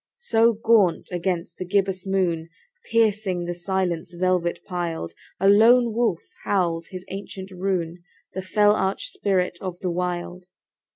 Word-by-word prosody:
So 230 Hz, -, +3 dB
gaunt 215 Hz, -5 st, +2 dB
against 175 Hz, -1 st, -3 dB
the -, -, -2 dB
gibbous 195 Hz, -1 st, 0 dB
moon, 175 Hz, -4 st, 0 dB, 0.4 s
Piercing 210 Hz, -6 st, +1 dB
the 175 Hz, -, -3 dB
silence 175 Hz, -1 st, -2 dB
velvet 180 Hz, -1 st, 0 dB
piled, 170 Hz, -, -4 dB, 0.3 s
A 195 Hz, -, +3 dB
lone 230 Hz, +3 st, +6 dB
wolf 220 Hz, -7 st, 0 dB, 0.2 s
howls 170 Hz, -4 st, 0 dB
his 185 Hz, -1 st, -8 dB
ancient 195 Hz, 0 st, -7 dB
rune— 180 Hz, -2 st, -2 dB, 0.3 s
The 190 Hz, -, -3 dB
fell 205 Hz, +2 st, +3 dB
arch 195 Hz, -, -1 dB
spirit 190 Hz, -, 0 dB
of 185 Hz, -2 st, -5 dB
the 180 Hz, -, -1 dB
Wild. 180 Hz, 0 st, -3 dB
185 Hz, 135 wpm, -24 LUFS, 175-205 Hz, 0.4 s, lone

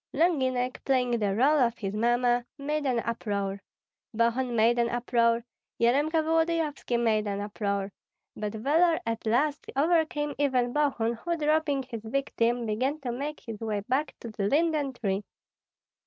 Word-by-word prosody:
Longinek, 260 Hz, -6 st, +1 dB
playing 255 Hz, -2 st, +1 dB
the 200 Hz, -2 st, 0 dB
rôle 280 Hz, +6 st, +4 dB
of 235 Hz, -1 st, 0 dB
his 195 Hz, -2 st, -4 dB
mamma, 240 Hz, +2 st, +2 dB
made 295 Hz, +1 st, -2 dB
an 245 Hz, -3 st, +1 dB
uproar, 200 Hz, -4 st, -3 dB, 0.5 s
Bogun 235 Hz, +2 st, +1 dB
made 230 Hz, +2 st, +3 dB
an 235 Hz, 0 st, +2 dB
uproar, 235 Hz, -1 st, +1 dB, 0.4 s
Yaremka 290 Hz, +7 st, +3 dB
Volodyovski 320 Hz, -5 st, 0 dB
made 220 Hz, -3 st, +1 dB
an 200 Hz, 0 st, -2 dB
uproar; 200 Hz, -1 st, -2 dB, 0.4 s
but 210 Hz, 0 st, -4 dB
valor 320 Hz, +9 st, +3 dB
at 230 Hz, 0 st, -3 dB
last 285 Hz, +6 st, +1 dB
overcame 300 Hz, -1 st, +1 dB
even 255 Hz, -4 st, +1 dB
Bogun, 270 Hz, -6 st, +1 dB
who, 335 Hz, +9 st, -3 dB
dropping 305 Hz, -2 st, +1 dB
his 235 Hz, -3 st, -7 dB
victim, 240 Hz, -1 st, 0 dB
began 255 Hz, +8 st, -1 dB
to 250 Hz, -3 st, -3 dB
make 285 Hz, +5 st, -4 dB
his 225 Hz, -4 st, -7 dB
way 215 Hz, -2 st, -2 dB
back 265 Hz, +8 st, -1 dB
to 230 Hz, -, -7 dB
the 200 Hz, -2 st, -2 dB
linden 300 Hz, 0 st, +1 dB
tree. 200 Hz, -4 st, -2 dB
245 Hz, 150 wpm, -28 LUFS, 225-290 Hz, 0.5 s, rôle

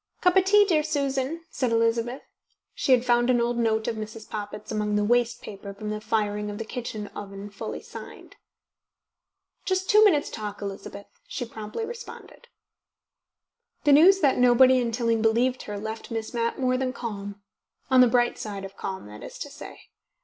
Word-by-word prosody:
"Cup 360 Hz, 0 st, +3 dB
of 380 Hz, -1 st, +5 dB
tea, 415 Hz, +1 st, +6 dB
dear 330 Hz, -6 st, +3 dB
Susan?" 285 Hz, +1 st, -2 dB
said 255 Hz, -3 st, -1 dB
Elizabeth. 230 Hz, +2 st, +1 dB, 0.5 s
She -, -, -1 dB
had 250 Hz, -1 st, +5 dB
found 240 Hz, 0 st, +3 dB
an 245 Hz, -1 st, +4 dB
old 240 Hz, 0 st, 0 dB
note 220 Hz, -1 st, +1 dB
of 225 Hz, -, -2 dB
Mrs. 215 Hz, 0 st, -7 dB
Poppit's 210 Hz, 0 st, -6 dB
among 210 Hz, -1 st, -1 dB
the 210 Hz, -, +2 dB
waste 240 Hz, +2 st, +1 dB
paper 200 Hz, -1 st, -8 dB
for 215 Hz, -, -13 dB
the 210 Hz, 0 st, -3 dB
firing 210 Hz, -1 st, -1 dB
of 205 Hz, -, -6 dB
the 225 Hz, -, -5 dB
kitchen 220 Hz, -3 st, -5 dB
oven 200 Hz, 0 st, -8 dB
fully 200 Hz, -, -6 dB
signed. -, -, -11 dB, 1.3 s
"Just 375 Hz, 0 st, 0 dB
two 425 Hz, +1 st, +7 dB
minutes' 330 Hz, -9 st, +3 dB
talk, 210 Hz, -2 st, -6 dB
Elizabeth," 200 Hz, 0 st, -7 dB, 0.2 s
she 245 Hz, -, -4 dB
promptly 220 Hz, -, -6 dB
responded. 475 Hz, +1 st, -10 dB, 1.4 s
The 290 Hz, -3 st, +5 dB
news 375 Hz, +7 st, +7 dB
that 275 Hz, -3 st, +3 dB
nobody 255 Hz, +1 st, +6 dB
in 235 Hz, -2 st, -1 dB
Tilling 230 Hz, -1 st, 0 dB
believed 240 Hz, +3 st, +2 dB
her 205 Hz, -1 st, -5 dB
left 220 Hz, +2 st, -6 dB
Miss 225 Hz, -1 st, -4 dB
Mapp 235 Hz, -1 st, -1 dB
more 255 Hz, -1 st, +1 dB
than 255 Hz, -1 st, -1 dB
calm, 205 Hz, -4 st, -6 dB, 0.5 s
on 260 Hz, -1 st, +7 dB
the 250 Hz, -, +7 dB
bright 240 Hz, 0 st, +2 dB
side 200 Hz, -2 st, -5 dB
of 195 Hz, -, -10 dB
calm, 190 Hz, -, -5 dB
that 105 Hz, +1 st, -11 dB
is -, -, -9 dB
to -, -, -7 dB
say. -, -, -11 dB
230 Hz, 180 wpm, -26 LUFS, 210-260 Hz, 1.4 s, two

